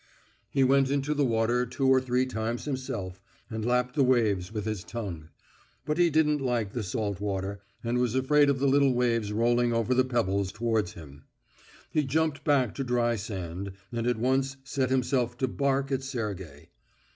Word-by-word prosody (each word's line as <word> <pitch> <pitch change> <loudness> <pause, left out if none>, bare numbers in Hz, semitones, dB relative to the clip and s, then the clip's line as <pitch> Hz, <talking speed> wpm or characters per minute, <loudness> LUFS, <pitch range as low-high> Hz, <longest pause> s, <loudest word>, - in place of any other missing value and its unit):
He 135 - +2
went 135 0 +4
into 140 +1 0
the 145 -1 +1
water 120 0 +2
two 130 +3 -1
or 130 0 +5
three 130 0 +1
times 115 -1 -3
himself, 115 -10 -4 0.3
and 110 0 -3
lapped 125 +1 +1
the 145 - +3
waves 110 -8 +2
with 105 -2 -4
his 110 -4 -3
tongue. 90 -9 -6 0.6
But 150 +3 -1
he 175 -1 +5
didn't 150 -2 +2
like 120 -6 -1
the 120 - -2
salt 100 0 -3
water, 100 0 -3 0.2
and 120 +1 0
was 125 -1 0
afraid 145 +2 +4
of 140 - +2
the 135 - 0
little 135 -1 +4
waves 115 -4 +1
rolling 120 +2 +2
over 115 +2 +1
the 130 0 +4
pebbles 100 -6 0
towards 110 -4 -1
him. 70 -4 -13 0.7
He 155 - +2
jumped 155 +2 0
back 135 -7 +2
to 135 - -3
dry 120 -2 +1
sand, 95 -2 -5 0.2
and 120 0 -2
at 120 -2 +1
once 135 +3 0
set 135 -1 -1
himself 125 -2 0
to 130 - 0
bark 140 +1 0
at 135 -1 0
Sergey. 95 - -5
120 Hz, 180 wpm, -28 LUFS, 110-135 Hz, 0.7 s, or